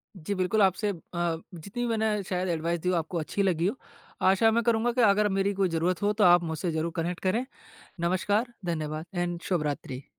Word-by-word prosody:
जी, 185 Hz, +2 st, -4 dB
बिल्कुल 185 Hz, +4 st, +1 dB
आपसे 195 Hz, +2 st, +2 dB
अ, 200 Hz, -, -1 dB, 0.6 s
जितनी 200 Hz, +9 st, -5 dB
भी -, -, 0 dB
मैंने 220 Hz, -2 st, +1 dB
शायद 185 Hz, 0 st, -2 dB
एडवाइस 170 Hz, +1 st, -1 dB
दी 180 Hz, -, -1 dB
हो 180 Hz, -, +2 dB
आपको 165 Hz, +1 st, -2 dB
अच्छी 200 Hz, +6 st, -1 dB
लगी 170 Hz, -3 st, +1 dB
हो। 210 Hz, -, -1 dB, 0.5 s
आशा 195 Hz, +4 st, +5 dB
मैं 235 Hz, +1 st, +2 dB
करूँगा 235 Hz, +1 st, +2 dB
कि 245 Hz, -, +1 dB
अगर 210 Hz, -1 st, +4 dB
मेरी 195 Hz, +1 st, +1 dB
कोई 190 Hz, -2 st, +1 dB
ज़रूरत 165 Hz, +2 st, 0 dB
हो 205 Hz, +1 st, +2 dB
तो -, -, +5 dB
आप 175 Hz, -1 st, +6 dB
मुझसे 165 Hz, +1 st, -2 dB
ज़रूर 160 Hz, +1 st, -1 dB
कनेक्ट 170 Hz, +1 st, -2 dB
करें। 220 Hz, +7 st, +1 dB, 0.6 s
नमस्कार, 205 Hz, +7 st, 0 dB
धन्यवाद 155 Hz, -1 st, -3 dB
एंड 175 Hz, -1 st, -2 dB
शुभरात्रि। 145 Hz, -6 st, -2 dB
185 Hz, 200 wpm, -28 LUFS, 170-205 Hz, 0.6 s, आप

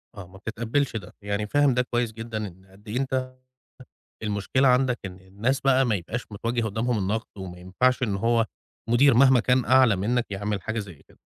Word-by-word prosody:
آه، 100 Hz, -4 st, -9 dB
ما 95 Hz, +2 st, -15 dB
بتتقبّلش 115 Hz, +6 st, -2 dB
ده، 100 Hz, -5 st, -6 dB
يعني 100 Hz, +1 st, -2 dB
فاهم 145 Hz, +3 st, +3 dB
ده 125 Hz, -, +2 dB
كويس 120 Hz, -2 st, -1 dB
جدًا 115 Hz, 0 st, -6 dB
إن 95 Hz, +1 st, -15 dB
قد 95 Hz, +3 st, -21 dB
إيه 110 Hz, +4 st, -3 dB
أنت 130 Hz, -1 st, -2 dB, 0.9 s
المشكلة 105 Hz, +6 st, +1 dB
عندك، 125 Hz, -1 st, +3 dB
إن 95 Hz, -1 st, -8 dB
الناس 105 Hz, +9 st, -2 dB
بقى 135 Hz, -1 st, +4 dB
ما 115 Hz, -4 st, +1 dB
يبقاش 105 Hz, +6 st, -4 dB
متوجّه 115 Hz, +3 st, -2 dB
قدامهم 110 Hz, +3 st, -1 dB
النقد، 105 Hz, +3 st, -1 dB
وما 95 Hz, -2 st, -7 dB
ينفعش 125 Hz, +9 st, +1 dB
إن 105 Hz, -5 st, 0 dB
هو 115 Hz, +2 st, +2 dB, 0.4 s
مدير 130 Hz, +4 st, +5 dB
مهما 130 Hz, +1 st, +6 dB
كان 125 Hz, +1 st, +2 dB
أعلى 130 Hz, -3 st, +5 dB
منك 115 Hz, +6 st, 0 dB
يعمل 100 Hz, 0 st, -3 dB
حاجة 110 Hz, +4 st, -3 dB
زي 100 Hz, -4 st, -7 dB
كده، -, -, -23 dB
115 Hz, 190 wpm, -25 LUFS, 100-125 Hz, 0.9 s, مهما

